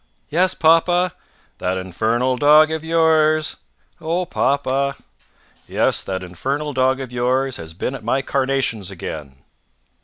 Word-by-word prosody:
"Yes, 180 +4 +2
papa." 175 +2 +3 0.5
"That 90 +1 -1
infernal 110 +8 0
dog 150 +3 +5
of 160 0 -3
yours 160 -1 +2 0.2
" - - -38
"Oh, 170 +3 -1
papa!" 140 -4 0 0.7
"Yes, - - +1
that 95 -1 -4
infernal 140 - -3
dog 130 0 +2
of 130 -2 -6
yours 130 +2 0
has 80 0 -9
been 125 - -3
at 135 - -8
my 130 +4 0
carnations 135 -8 -1
again!" 75 -7 -8
135 Hz, 130 wpm, -20 LUFS, 115-155 Hz, 0.7 s, dog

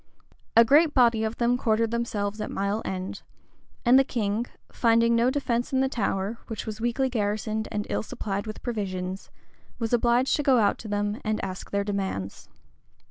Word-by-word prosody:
[*] - - -10
A 230 - +9
great 295 +5 +4
body 235 -4 +4
of 220 +1 -2
them 240 +1 +2
quartered 225 -1 +1
themselves 215 -3 -2
at - - -3
Mile 200 +2 -1
End; 185 0 -5 0.6
and 250 +3 +7
the - - +5
king, 225 -2 -2 0.2
finding 230 0 +3
no 235 +2 +3
defence 250 -3 -1
in 260 - +2
the 265 - +2
Tower, 210 -3 -2
which 225 - -5
was 220 0 -6
weakly 240 +3 +1
garrisoned 215 -2 -2
and 210 -1 -2
ill - - -1
supplied 200 -1 -4
with 215 - -7
provisions, 190 -5 -4 0.5
was 230 0 -2
obliged 240 +2 +3
to - - 0
go 275 -3 +4
out 205 -3 +2
to 225 - -8
them 205 +1 -2
and 215 0 -1
ask 185 -1 -7
their 200 0 0
demands. 190 - -4
220 Hz, 185 wpm, -26 LUFS, 205-240 Hz, 0.6 s, A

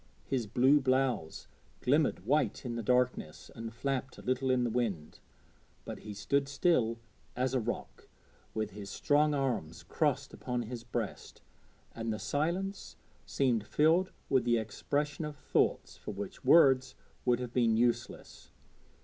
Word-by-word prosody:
His 125 -5 -1
blue 130 +7 +4
blouse 130 - 0 0.4
glimmered 140 - +2
white 145 +2 +1
in 120 - -3
the 115 - -2
darkness 125 -8 0
and 115 0 -6
flapped 135 +2 -3
a - - -11
little 130 +1 0
in 130 -1 +3
the 120 - 0
wind, 105 -10 -2 0.7
but - - -6
he 105 -1 -8
stood 140 +8 0
still 135 -6 +2 0.4
as 130 +1 0
a 130 - +2
rock, 120 +1 -5 0.5
with 110 -1 -2
his 100 0 -8
strong 150 +7 +2
arms 125 - -2
crossed 140 -3 0
upon 125 -1 -3
his 115 +1 -7
breast, 120 -3 -5 0.5
and 115 0 -3
the 105 - -2
silence 170 - -2 0.3
seemed 120 -6 +1
filled 165 +5 +3 0.2
with 130 -3 +3
the 120 0 +3
expression 145 +8 -2
of 150 -1 -5
thoughts - - 0
for - - -9
which 100 +6 -7
words 130 -2 +5 0.3
would 125 -1 +2
have 125 -1 -5
been 115 -3 +3
useless. 120 0 -1
125 Hz, 150 wpm, -32 LUFS, 115-140 Hz, 0.7 s, words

